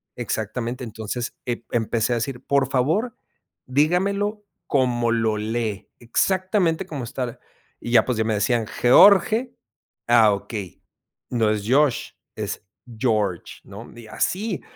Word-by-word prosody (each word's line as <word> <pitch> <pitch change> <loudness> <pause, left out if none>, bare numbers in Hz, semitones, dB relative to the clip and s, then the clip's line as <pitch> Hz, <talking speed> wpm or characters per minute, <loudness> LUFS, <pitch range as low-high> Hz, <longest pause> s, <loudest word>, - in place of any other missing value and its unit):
Exactamente, 120 +2 -3
entonces, 110 +2 -5
eh, 120 -1 -3
empecé 115 +1 0
a - - +1
decir: 120 +2 -3
"Por 135 -1 +1
favor, 165 - 0 0.5
dígamelo 200 +9 0 0.2
como 120 -4 +1
lo 115 -2 +1
lee, 110 -2 -3
exactamente 185 - 0
como 145 -8 -6
está", 125 -1 -5 0.4
y 120 - -5
ya, 115 -3 +5
pues, 125 -3 -1
ya 110 - +1
me 110 0 0
decían: 115 +1 +1
"George, 215 - +5 0.5
ah, 115 -3 +6
okey, 100 -2 -6 0.5
no 115 -3 +1
es 105 -1 -2
Josh, 140 0 +2 0.3
es - - -5 0.3
George", 105 -7 -1
¿no? 105 +4 -11
Y 115 -2 -11
así, 195 - -2
120 Hz, 130 wpm, -23 LUFS, 110-155 Hz, 0.5 s, ah